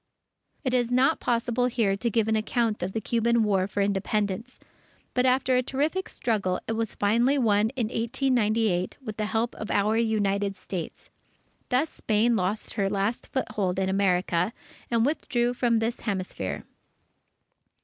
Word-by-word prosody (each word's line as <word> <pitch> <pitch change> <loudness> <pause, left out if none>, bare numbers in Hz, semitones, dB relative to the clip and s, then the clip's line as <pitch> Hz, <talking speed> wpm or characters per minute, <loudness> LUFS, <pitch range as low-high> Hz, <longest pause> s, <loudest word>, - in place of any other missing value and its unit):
It 255 -3 -1
is 245 -1 +1
not 260 +5 +3
possible 240 +1 +1
here 225 -5 +1
to 235 +4 -1
give 225 -1 +1
an 220 - +2
account 220 0 0
of 185 +2 -3
the 225 - -1
Cuban 235 +1 +2
War 195 -3 +2
for 200 0 -2
Independence. 205 +3 -1 0.5
But 250 +1 +2
after 255 0 +3
a 250 - +4
terrific 295 +9 -1
struggle, 200 -6 -1
it - - -1
was 225 -1 -2
finally 235 +7 +2
won 215 -4 +3
in 245 -4 0
1898, 225 -6 +1
with 215 -2 -5
the 215 - -1
help 225 +2 -1
of 215 - -6
our 210 +2 +2
United 205 -3 +1
States. 185 -3 -7 0.6
Thus 275 +5 +1
Spain 225 +2 +1
lost 200 +2 -2
her 195 -1 0
last 200 +3 -1
foothold 210 -8 -2
in 190 0 0
America, 185 0 +1 0.4
and 230 -1 +2
withdrew 245 -4 0
from 240 -2 +2
this 225 +1 -1
hemisphere. 185 - -3
220 Hz, 155 wpm, -26 LUFS, 200-240 Hz, 0.6 s, a